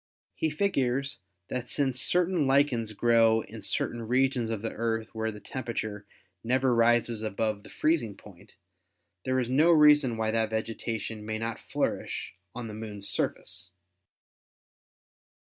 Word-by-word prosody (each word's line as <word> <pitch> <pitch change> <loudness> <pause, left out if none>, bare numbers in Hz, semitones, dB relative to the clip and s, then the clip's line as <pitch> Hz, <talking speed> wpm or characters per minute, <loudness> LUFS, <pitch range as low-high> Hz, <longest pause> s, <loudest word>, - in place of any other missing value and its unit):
He 160 - 0
figures 140 -6 0 0.3
that 125 -1 -4
since 130 -3 +1
certain 175 -2 +2
lichens 135 -5 +2
grow 115 0 +4
in 110 0 -10
certain 120 - -2
regions 125 0 +1
of 110 -2 -3
the 115 - -2
Earth 115 -1 -2
where 110 0 -2
the 105 - -10
temperature 110 -5 -5 0.4
never 130 +2 +2
rises 115 -1 +3
above 110 0 -1
the - - -14
freezing 150 -11 0
point, - - -16 0.7
there 130 0 +1
is 125 - -1
no 145 +7 +4
reason 150 -6 +6
why 110 0 0
that 110 -1 +1
vegetation 110 0 -3
may 110 0 -3
not 115 0 -3
flourish - - -3 0.2
on 120 -2 -5
the 110 - -7
Moon's 105 -2 -5
surface. 90 +1 -3
115 Hz, 140 wpm, -28 LUFS, 110-130 Hz, 0.7 s, reason